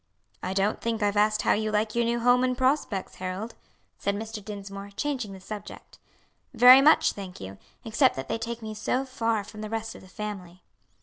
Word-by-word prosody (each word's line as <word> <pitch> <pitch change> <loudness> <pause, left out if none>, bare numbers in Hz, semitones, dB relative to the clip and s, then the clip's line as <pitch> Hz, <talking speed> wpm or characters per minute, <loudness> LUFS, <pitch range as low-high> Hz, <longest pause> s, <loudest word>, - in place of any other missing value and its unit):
"I 185 - -3
don't 200 +2 +1
think 230 -2 -1
I've 205 0 +1
asked 215 +1 +2
how - - +4
you 215 +1 -1
like 215 +1 0
your 235 - +2
new 235 +1 0
home 245 +1 +4
and 255 -1 0
prospects, 260 -7 0
Harold," 185 +5 -5 0.5
said 200 - -1
Mr. 220 0 -6
Dinsmore, 200 -1 -7
changing 260 -8 -2
the 190 - -10
subject. 205 +2 -9 0.6
"Very 250 +3 +9
much, 300 +3 +5
thank 190 -3 -9
you; 95 0 -9 0.3
except 240 +4 +3
that 135 0 -5
they 225 - -2
take 230 0 -5
me 215 0 -5
so 250 +5 -1
far 230 -5 -1
from 215 +1 -10
the 215 - -5
rest 225 0 -3
of - - -12
the 190 - -15
family." 185 -3 -7
215 Hz, 200 wpm, -27 LUFS, 200-235 Hz, 0.6 s, Very